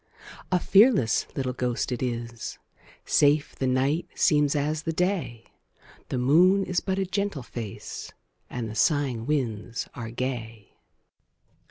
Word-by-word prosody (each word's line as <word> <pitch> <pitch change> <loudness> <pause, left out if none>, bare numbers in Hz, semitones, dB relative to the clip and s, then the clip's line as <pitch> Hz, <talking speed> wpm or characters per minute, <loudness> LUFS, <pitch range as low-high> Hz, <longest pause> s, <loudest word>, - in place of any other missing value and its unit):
A 180 - +3
fearless 195 - +4
little 130 -2 -2
ghost 125 0 -2
it 125 - -3
is; 120 -2 -4 0.5
Safe 145 0 +3
the 130 - -1
night 140 +7 +1
seems 150 -2 +3
as 150 +2 0
the 165 - -2
day; 165 - -1 0.6
The - - -2
moon 175 +10 +5
is 180 -2 0
but 190 -1 -2
a 195 - 0
gentle 195 -6 -2
face, 115 -4 -7 0.4
And 120 -2 -4
the 110 - -6
sighing 125 -1 +1
winds 120 -6 -2
are 115 -2 -6
gay. 115 -4 -5
135 Hz, 135 wpm, -26 LUFS, 120-165 Hz, 0.6 s, moon